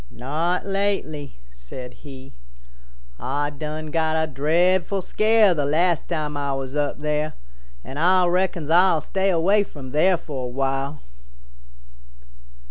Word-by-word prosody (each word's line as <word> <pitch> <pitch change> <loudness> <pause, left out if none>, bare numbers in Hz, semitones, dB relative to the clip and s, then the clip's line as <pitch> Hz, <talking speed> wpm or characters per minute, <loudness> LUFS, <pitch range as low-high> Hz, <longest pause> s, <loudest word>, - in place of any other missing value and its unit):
"Not 155 - -2
lately," 195 -8 -2 0.2
said 125 - -9
he; 135 -2 -12 0.9
"Ah 145 +3 -2
done 155 +1 -6
got 160 -1 +1
a 160 - +2
dreadful 170 +7 +1
scare 215 +1 +3
the 145 -4 -1
last 170 +3 +1
time 150 -3 -2
Ah 140 -1 -1
was 135 +1 -5
up 145 -1 -1
there, 150 0 -1 0.5
and 140 - -6
Ah 180 +2 +4
reckons 175 -3 0
Ah'll 175 -1 +5
stay 195 +4 0
away 190 +4 +3
from 140 -9 -8
there 175 +5 +3
for 140 -6 -6
a - - -4
while." 135 +3 -2
155 Hz, 130 wpm, -23 LUFS, 140-180 Hz, 0.9 s, Ah'll